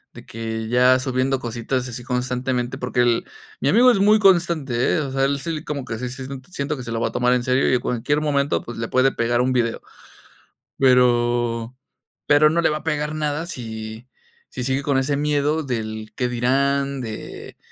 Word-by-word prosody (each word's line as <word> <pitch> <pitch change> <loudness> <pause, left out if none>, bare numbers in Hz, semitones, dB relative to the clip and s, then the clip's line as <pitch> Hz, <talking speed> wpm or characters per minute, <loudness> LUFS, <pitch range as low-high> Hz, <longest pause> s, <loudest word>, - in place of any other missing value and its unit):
de - - -12
que 110 0 -5
ya 125 +2 +4
subiendo 130 +1 0
cositas 125 +1 -3
así 120 0 -7
constantemente, 125 0 -2
porque 125 -2 -3
el 120 -1 +2 0.4
mi - - +2
amigo 245 +4 +6
es 240 - +4
muy 210 +2 +5
constante, 170 - +2
¿eh? - - +1
o 140 -3 -3
sea, 135 0 0
él 140 0 0
sí, 160 0 -4
como 140 -3 -4
que 115 - -5
sí 125 +2 -4
sí, 130 +1 -7 0.2
siento 145 -2 -3
que 130 - -7
se 115 - -6
lo 115 0 -2
va - - +1
a - - -5
tomar 125 0 +2
en 125 - +1
serio, 130 +2 +1
y - - +2
en 125 - +3
cualquier 125 +6 -1
momento, 145 -1 +1
pues, 120 - -9
le 115 - -3
puede 130 +1 +3
pegar 120 +1 0
un 130 +1 +1
video, 115 -2 0 1.0
pero 120 -2 +2 0.5
pero 150 +1 +5
no 170 +1 +1
le - - +3
va 150 - -1
a - - -17
pegar 150 -1 -2
nada 150 +2 -2
si 110 -5 -7 0.4
si 125 - -5
sigue 135 +2 -1
con 140 -1 +1
ese 140 +2 0
miedo 150 +1 0
del 110 -4 -5
qué 125 -1 -1
dirán, 135 +3 0
de 110 -3 -8
130 Hz, 205 wpm, -22 LUFS, 120-145 Hz, 1.0 s, amigo